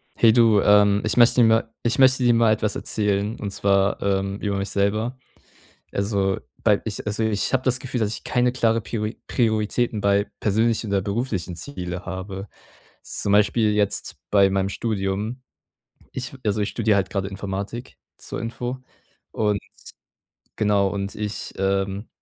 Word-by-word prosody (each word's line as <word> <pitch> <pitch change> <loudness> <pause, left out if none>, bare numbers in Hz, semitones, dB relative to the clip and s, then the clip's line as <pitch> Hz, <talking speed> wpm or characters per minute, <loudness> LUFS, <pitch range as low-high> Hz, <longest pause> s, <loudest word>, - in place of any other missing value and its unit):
Hey, 115 -1 +5
du, 115 -3 +5
ähm, 105 0 +5
ich 110 - -1
möchte 120 +1 +6
mir 115 - +6
ma 110 0 +4 0.2
ich 120 - 0
möchte 130 -1 +5
dir 120 -1 +5
mal 115 -1 +4
etwas 110 0 0
erzählen. 105 +1 -1
Und 100 - -4
zwar, 100 0 +1
ähm, 100 0 -1
über 100 -2 -1
mich 100 +1 -3
selber. 110 +5 0 0.7
Also, 100 -1 0 0.2
bei - - +3
ich - - -5
also, 105 +1 -1
ich 110 -2 0
habe 130 -1 +2
das 130 -1 +1
Gefühl, 130 -1 -4
dass 110 -1 0
ich - - -8
keine 125 0 +1
klare 115 -2 +1
Piori 105 +1 -4
Prioritäten 110 -1 0
bei 100 0 +2
persönlichen 110 +2 +1
oder 100 -1 +2
beruflichen 100 -4 -3
Ziele 90 -6 -6
habe, 95 +1 -6 0.6
zum 100 - -1
Beispiel 105 +1 +3
jetzt 105 -1 0
bei 100 -1 +5
meinem 95 0 0
Studium. 105 +3 -2 0.7
Ich 130 0 -5
also, 105 0 0
ich 105 - 0
studiere 110 -3 +1
halt 95 -2 0
gerade 95 -1 -2
Informatik, 100 +5 -6 0.2
zur - - -6
Info, 120 +2 -4 0.5
und 105 -2 0 1.0
genau 100 -2 +2
und 100 0 -4
ich 105 0 -5
Ähm, 95 +2 -1
105 Hz, 160 wpm, -23 LUFS, 100-115 Hz, 1.0 s, möchte